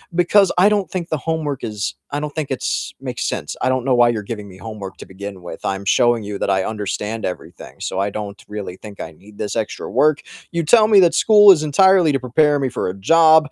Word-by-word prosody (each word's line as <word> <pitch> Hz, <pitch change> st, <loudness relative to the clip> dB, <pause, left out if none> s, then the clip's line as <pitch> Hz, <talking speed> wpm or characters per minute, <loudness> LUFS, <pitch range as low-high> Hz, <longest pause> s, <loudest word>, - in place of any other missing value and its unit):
"Because 180 Hz, +3 st, +4 dB
I 195 Hz, +3 st, +5 dB
don't 205 Hz, -2 st, 0 dB
think 175 Hz, -2 st, -5 dB
the 155 Hz, -, -1 dB
homework 150 Hz, -2 st, -3 dB
is 105 Hz, -1 st, -4 dB, 0.2 s
I 145 Hz, -, -2 dB
don't 150 Hz, 0 st, -5 dB
think 155 Hz, -3 st, -4 dB
it's 130 Hz, -, -3 dB
makes -, -, -4 dB
sense. -, -, -5 dB
I -, -, +1 dB
don't 130 Hz, -1 st, -1 dB
know 130 Hz, -, +2 dB
why 120 Hz, -1 st, +4 dB
you're 110 Hz, -3 st, -2 dB
giving 105 Hz, -1 st, -7 dB
me 95 Hz, -1 st, -14 dB
homework 105 Hz, -2 st, -8 dB
to -, -, -10 dB
begin 95 Hz, -1 st, -9 dB
with, 90 Hz, -, -9 dB
I'm 95 Hz, 0 st, -3 dB
showing 120 Hz, +2 st, +2 dB
you 100 Hz, -1 st, -6 dB
that -, -, -2 dB
I 95 Hz, -1 st, +1 dB
understand 110 Hz, +1 st, -4 dB
everything, 90 Hz, -, -8 dB
so 95 Hz, -, -4 dB
I 100 Hz, +1 st, 0 dB
don't 100 Hz, -1 st, -7 dB
really 105 Hz, -3 st, -7 dB
think 105 Hz, -2 st, -12 dB
I 80 Hz, -, -7 dB
need 100 Hz, +6 st, -18 dB
this 105 Hz, -, -4 dB
extra 110 Hz, -2 st, -4 dB
work. 150 Hz, -1 st, +2 dB, 0.3 s
You 170 Hz, -1 st, -1 dB
tell 215 Hz, +6 st, +5 dB
me 205 Hz, -3 st, +6 dB
that 170 Hz, -3 st, +4 dB
school 205 Hz, +1 st, +7 dB
is 170 Hz, -5 st, +4 dB
entirely 180 Hz, +2 st, +4 dB
to 135 Hz, -, 0 dB
prepare 145 Hz, +4 st, +2 dB
me 135 Hz, -, -1 dB
for 110 Hz, -, -3 dB
a -, -, -4 dB
job. 160 Hz, +7 st, +4 dB
125 Hz, 240 wpm, -19 LUFS, 105-160 Hz, 0.3 s, school